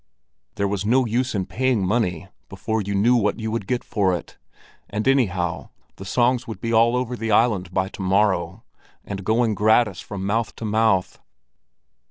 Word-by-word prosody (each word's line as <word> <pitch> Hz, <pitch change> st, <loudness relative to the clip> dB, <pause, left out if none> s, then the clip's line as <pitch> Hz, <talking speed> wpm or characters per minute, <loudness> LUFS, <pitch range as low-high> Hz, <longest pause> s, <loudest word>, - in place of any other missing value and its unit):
There 100 Hz, -, 0 dB
was 100 Hz, 0 st, -2 dB
no 125 Hz, +5 st, +3 dB
use 120 Hz, +2 st, -1 dB
in 95 Hz, -2 st, -1 dB
paying 125 Hz, -3 st, 0 dB
money 95 Hz, -4 st, -1 dB, 0.2 s
before 110 Hz, +3 st, -2 dB
you 100 Hz, 0 st, -3 dB
knew 115 Hz, +5 st, +4 dB
what 110 Hz, -1 st, +1 dB
you 110 Hz, 0 st, -3 dB
would 110 Hz, -4 st, -3 dB
get 125 Hz, -1 st, -1 dB
for 95 Hz, -4 st, 0 dB
it; 85 Hz, -, -8 dB, 0.5 s
and 105 Hz, +4 st, -3 dB
anyhow 90 Hz, -, 0 dB, 0.3 s
the 95 Hz, -, -9 dB
songs 125 Hz, +4 st, +1 dB
would 110 Hz, -, -7 dB
be 115 Hz, 0 st, -3 dB
all 115 Hz, +2 st, +4 dB
over 125 Hz, -1 st, -2 dB
the 115 Hz, -1 st, -3 dB
island 105 Hz, -5 st, +2 dB
by 95 Hz, 0 st, 0 dB
to 100 Hz, -, -9 dB
morrow, 95 Hz, 0 st, +1 dB, 0.4 s
and 100 Hz, -1 st, -6 dB
going 110 Hz, +2 st, +1 dB
gratis 105 Hz, -2 st, +2 dB
from 95 Hz, -2 st, -6 dB
mouth 110 Hz, +3 st, -1 dB
to 115 Hz, -, -6 dB
mouth. 110 Hz, -3 st, +1 dB
105 Hz, 180 wpm, -22 LUFS, 95-115 Hz, 0.5 s, knew